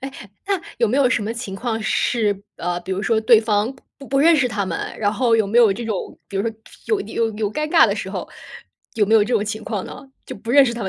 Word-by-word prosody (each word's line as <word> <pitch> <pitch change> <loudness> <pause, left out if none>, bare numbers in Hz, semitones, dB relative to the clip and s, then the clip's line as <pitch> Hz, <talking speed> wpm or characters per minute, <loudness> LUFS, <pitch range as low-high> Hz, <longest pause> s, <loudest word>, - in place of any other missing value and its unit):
哎， 270 0 -6 0.3
那 395 -2 0 0.2
有 235 - +2
没 245 - 0
有 275 -3 +4
什 235 - 0
么 215 +2 -3
情 235 -4 -6
况 225 +2 -3
是， 215 -2 0
呃， 175 0 -3
比 180 +2 -9
如 190 +2 -2
说 220 0 +1
对 220 0 +6
方 215 +2 0 0.2
不 275 - -11
不 275 - +1
认 330 +4 +6
识 265 -4 +2
他 210 -3 -2
们， 175 -3 -5
然 205 -1 +1
后 230 0 +2
有 220 -2 +2
没 220 +4 +2
有 225 -4 +6
这 235 +5 -6
种 215 -4 -4
比 195 - -6
如 195 - +1
说 230 - -1 0.4
有 435 -3 +1
有 225 -1 -1
有 210 -1 -3
尴 305 +4 -2
尬 325 0 +6
的 - - 0
时 - - -5
候， - - -5 0.7
有 215 - +3
没 215 +2 +2
有 220 - +6
这 240 +3 -1
种 210 -2 +1
情 215 +1 -4
况 210 -5 -3
呢？ - - -9 0.2
就 - - -7
不 225 +3 -7
认 280 +2 +7
识 240 - -1
他 235 - -5
们 195 - -2
225 Hz, 300 characters per minute, -21 LUFS, 205-250 Hz, 0.7 s, 认